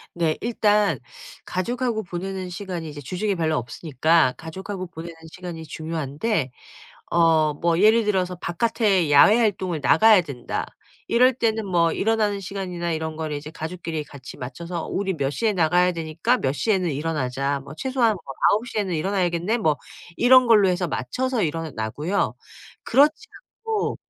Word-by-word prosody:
네 165 -2 +1
일단 210 -3 +2 0.5
가족하고 235 +4 -2
보내는 185 0 -5
시간이 175 -3 -5
이제 145 0 -8
주중에 185 +8 -2
별로 160 -2 0
없으니까 135 +3 +1
가족하고 185 +3 -7
보내는 170 0 -9 0.2
시간이 175 -3 -7
중요한데 155 - -2 0.6
어 160 -2 +3
뭐 170 +1 +1
예를 220 +2 +5
들어서 185 -3 0
'바깥에 190 -3 +1
야외활동을 190 -1 +4
나가야 215 +2 +6
된다.' 140 -7 -5 0.4
이럴 250 +2 +5
때는 225 -3 0
뭐 170 -3 +2
일어나는 210 +1 0
시간이나 180 -3 -4
이런 160 0 -4
걸 155 -1 -3
이제 145 +1 -6
가족끼리 160 -1 -5
같이 135 -3 -11
맞춰서 170 +7 -6
"우리 195 -1 -1
몇 140 -5 -1
시에 220 +9 0
나가야 180 0 +3
되니까 165 +9 0
몇 135 0 -1
시에는 185 +1 0
일어나자. 140 -2 -2
뭐 140 +2 -11
최소한 255 +2 +1
뭐 195 - -8 0.3
9:00 220 +1 -1
에는 190 -4 -1
일어나야겠네?" 180 +3 0
뭐 155 -10 +1 0.4
이런 255 +2 +6
걸로 210 -4 +6
해서 180 -1 0
맞춰서 240 - -2
일어나고요. 155 - -2 0.5
그렇지 295 +3 +3 0.4
않고 440 -2 -1
175 Hz, 340 characters per minute, -23 LUFS, 155-210 Hz, 0.6 s, 나가야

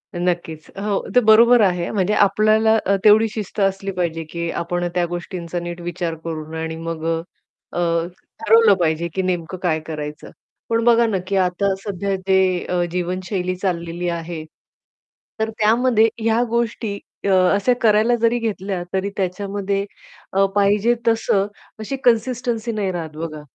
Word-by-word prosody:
नक्कीच, 175 -3 -2
हो 200 0 0 0.2
ते - - +8
बरोबर 230 +2 +6
आहे 180 -4 +1
म्हणजे 200 0 +1
आपल्याला 215 +2 +4
अ, 200 - +3
तेवढी 215 +1 +6
शिस्त 210 -1 -6
असली 195 0 0
पाहिजे, 170 -3 -2
की 170 +2 -5
आपण 175 +1 -2
त्या 175 -1 +2
गोष्टींचा 175 0 -5
नीट 175 0 -6
विचार 175 -1 -3
करून 160 -1 -6
आणि 160 0 -4
मग 165 0 -5 0.7
अ, - - -2 0.7
ठरवलं 225 -1 +6
पाहिजे, 165 0 0
की 190 - 0
नेमकं 180 -1 -2
काय 160 -3 +1
करायचं? 150 -1 -6 0.4
पण 230 0 +1
बघा 235 0 +5
ना 210 -3 0
की 200 - -1
आता 190 +1 +1
सध्या 200 -1 -2
जे 190 -2 +2
अ, 180 -1 +1
जीवनशैली 180 +1 -2
चाललेली 175 -2 -3
आहे. 170 -1 -5 1.0
तर 220 0 0
त्यामध्ये 225 +1 +4
ह्या 225 +2 +2
गोष्टी 225 -3 -2 0.3
अ, - - +1 0.2
अशा 200 +5 +2
करायला 220 +2 +4
जरी 230 +1 +3
घेतल्या 195 -5 -3
तरी 190 +1 0
त्याच्यामध्ये 195 +1 -2 0.5
अ, 195 +1 +4
पाहिजे 205 +4 +3
तसं 215 -3 +2 0.3
अशी 220 +5 -4
कन्सिस्टन्सी 240 -1 +1
नाही 205 -4 -1
राहत 160 -4 -5
बघा. 155 -2 -5
195 Hz, 150 wpm, -21 LUFS, 175-215 Hz, 1.0 s, ते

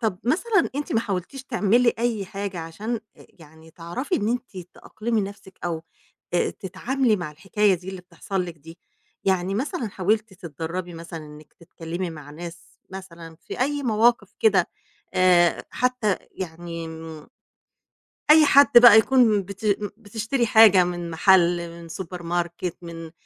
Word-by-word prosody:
طَب 215 -6 -1
مثلًا 400 - +1
أنتِ 290 +1 -3
ما 225 - +2
حاولتيش 205 +6 -4
تعملي 235 -1 +2
أي 230 -4 -1
حاجة 195 -2 -5
عشان، 210 +8 -5 0.2
آآ، - - -17
يعني 160 0 -16
تعرفي 175 - -4
إن 210 +1 -1
أنتِ 245 -4 -3 0.2
تأقْلمي 225 0 -3
نَفْسِك 195 -1 -8
أو، 165 -2 -3 0.5
آآ، 175 - +2
تتعاملي 240 +5 -1
مع 175 -5 -5
الحكاية 195 +5 +1
دي 180 +1 -9
اللي 190 -1 -6
بتحصل 185 +1 -4
لِك 170 -2 -9
دي؟ 165 +4 -14 0.5
يعني 190 0 +1
مثلًا 255 - -2
حاولتِ 210 +2 -1
تتدرّبي 175 0 -6
مثلًا 165 -1 -8
إنِّك 150 0 -14
تتكلّمي 170 +1 -6
مع 150 -3 -10
ناس 170 +2 -10
مثلًا 170 -4 -10
في - - -9
أي 285 +2 0
مواقف 225 -3 +2
كده، 195 -5 +3 0.5
آآ، 180 -2 +4
حتى 250 -6 0
يعني، 170 -1 -7
إمم، 160 -1 -9 1.0
أي 310 0 +8
حد 280 0 +7
بقى 240 -3 +10
يكون 220 -2 +4
بت 200 +3 -9 0.3
بتشتري 225 +3 -2
حاجة 215 -4 +7
من 175 -1 -4
محل 175 0 +3
من 170 0 -11
Supermarket 175 0 -4
من 165 -1 -9
190 Hz, 145 wpm, -24 LUFS, 170-225 Hz, 1.0 s, بقى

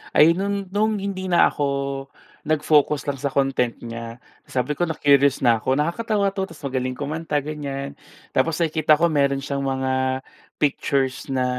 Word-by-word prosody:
Ay 160 +3 +7
no'n, 200 +2 -2
nung 215 +1 +1
hindi 195 -2 -4
na 175 - +5
ako, 145 -2 -1 0.8
nag-focus 150 -2 +2
lang 140 -2 -3
sa 140 - 0
content 135 -3 0
niya. 115 0 -7 0.3
Sabi 130 +3 -1
ko 175 +3 -1
na-curious 140 -3 +3
na 115 -2 +4
ako, 130 +4 +1
nakakatawa 200 +5 0
'to 195 -1 -3
tapos 145 - -14
magaling 130 -1 -2
kumanta, 150 +1 -2
ganiyan. 140 -2 -5 0.4
Tapos 155 +4 +1
nakikita 155 -2 +3
ko 170 - +3
meron 140 -2 +1
siyang 140 -1 -2
mga 130 -1 -1 0.3
pictures 135 -3 0
na 130 -1 0
145 Hz, 155 wpm, -23 LUFS, 130-165 Hz, 0.8 s, Ay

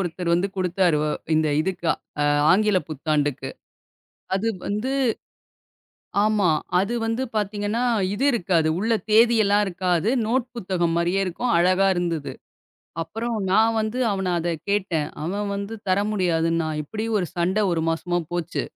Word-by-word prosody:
ஒருத்தர் 175 -1 -2
வந்து 185 +3 +1
குடுத்தார். 180 -3 +2
அ - - 0 0.2
இந்த 155 0 +2
இதுக்கு 175 -1 -2 0.6
ஆங்கிலப் 205 -1 +2
புத்தாண்டுக்கு. 145 -3 -1 0.8
அது 215 +4 0 0.2
வந்து 210 +6 -2 1.3
ஆமா. 210 -5 +2 0.3
அது 200 +5 -1
வந்து 225 +3 -1
பாத்தீங்கன்னா, 210 +3 -1 0.3
இது 215 +7 -2
இருக்காது. 170 -6 +1
உள்ள 225 +3 +1 0.2
தேதியெல்லாம் 215 -2 +5
இருக்காது. 180 +2 0 0.2
நோட் 250 +2 0
புத்தகம் 175 -5 -1
மாரியே 175 +3 +1
இருக்கும். 235 +7 -1
அழகா 185 +3 +3
இருந்தது. 170 -4 -2 0.7
அப்புறம் 225 +8 -3 0.2
நான் 220 +3 +4
வந்து 220 +4 -2
அவனைக் 185 -3 -1
அத 170 +1 -2 0.2
கேட்டேன். 180 -7 0 0.2
அவன் 200 +5 -2
வந்து 200 +2 -5 0.2
தர 185 +2 +3
முடியாதுன்னா, 165 -4 +1
இப்படி 215 +8 -5
ஒரு 180 - -1
சண்ட 180 +4 +1
1 165 -1 0
மாசமா 175 +2 -1
போச்சு. 175 -1 -2
185 Hz, 130 wpm, -23 LUFS, 170-215 Hz, 1.3 s, தேதியெல்லாம்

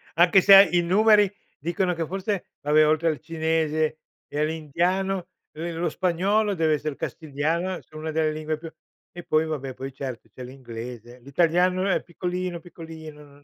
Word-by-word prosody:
anche 175 +3 +6
se 195 0 +9
i 175 -1 +3
numeri 205 +2 +4 0.3
dicono, 175 +4 -1
che 165 -1 -3
forse 195 +1 -3 0.2
vabbè, 150 +1 +4
oltre 155 +2 +2
al 155 - -2
cinese 155 -1 -1 0.3
e 145 - -5
all'indiano, 175 +5 -1 0.3
uhm, 165 +2 -5
lo 170 +1 0
spagnolo, 195 +5 +1
deve 160 -2 +2
esser 150 -1 -2
castigliano, 160 +6 -2
sia 155 - -22
1 160 +1 -4
delle 155 0 +1
lingue 155 0 -3
più 165 +1 -9 0.4
e 175 - -8
poi 155 0 +2
vabbè, 135 -5 -4
poi 135 0 -7
cert 130 -3 -7
c'è 130 - -9
l'inglese. 120 -1 -9
L'italiano 175 +7 +1
è 195 - +1
piccolino, 180 0 -4
piccolino 160 -3 -11
non 145 0 -19
160 Hz, 160 wpm, -25 LUFS, 150-180 Hz, 0.4 s, se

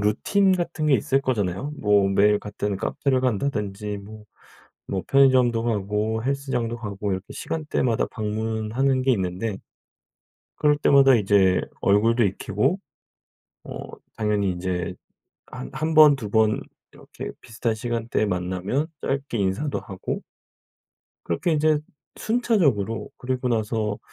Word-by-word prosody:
루틴 190 - +2
같은 170 -3 -2
게 140 - +5
있을 130 +4 +2
거잖아요. 110 +2 -1
뭐 105 -2 +3
매일 105 +1 +4
같은 105 -1 -3
카페를 130 +6 0
간다든지 105 -4 -2
뭐 105 +1 -11 0.7
뭐 95 -2 -1
편의점도 130 -4 +4
가고 110 0 -1
헬스장도 130 -4 -2
가고 100 -3 -4
이렇게 95 +1 -5
시간대마다 150 -7 -1
방문하는 110 +5 -1
게 130 0 +2
있는데 95 +1 -2 1.1
그럴 150 0 +4
때마다 135 -2 +6
이제 100 -3 +3 0.2
얼굴도 115 +4 +3
익히고 105 - 0 0.9
어 - - -8 0.4
당연히 105 -3 0
인제 90 0 -3 0.5
한 60 - -8
한 160 +1 -2
번, 150 -2 +8
2 115 -6 -6
번 110 0 +3 0.3
이렇게 - - -9
비슷한 115 0 -2
시간대에 115 -1 -1
만나면 95 - -2
짧게 135 -3 -2
인사도 100 +9 -1
하고 95 -4 -5 1.0
그렇게 85 - 0
인제 155 0 +3 0.4
순차적으로 170 - +1
그리고 130 0 -2
나서 110 -2 -1
110 Hz, 275 characters per minute, -24 LUFS, 100-135 Hz, 1.1 s, 번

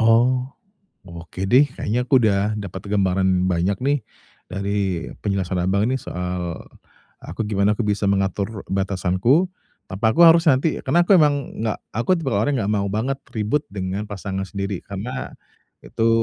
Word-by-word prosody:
Oh, 125 +3 +3 0.6
oke 85 +2 -8
deh 130 +6 +6
kayaknya 125 +4 -1
aku 130 -2 +4
udah 105 0 +2
dapet 95 -3 -6
gambaran 95 -2 +2
banyak 90 +3 0
nih 140 +2 +2 0.5
dari 100 -3 -2
penjelasan 95 -3 -1
Abang 100 +4 +1
nih 130 - 0
soal 90 -3 -4 0.6
aku - - -5
gimana 105 0 +2
aku - - -1
bisa 105 -1 0
mengatur 100 +1 -1
batasanku, 100 - +1 0.4
tanpa 110 +4 +1
aku 170 - +5
harus 165 +1 +6
nanti 140 +4 +1
karena 170 +7 +4
aku 195 - +6
emang 150 -2 +4 0.3
gak 110 - -1 0.2
aku 120 - +2
tipe 150 -5 -3
orang 115 +7 +1
gak 100 - -1
mau 100 -1 0
banget 125 +6 -1 0.2
ribut 110 +7 0
dengan 100 +1 -4
pasangan 95 -1 -4
sendiri, 100 -1 -4
karena 115 +7 -5 0.5
itu 115 0 0
100 Hz, 150 wpm, -22 LUFS, 95-125 Hz, 0.6 s, deh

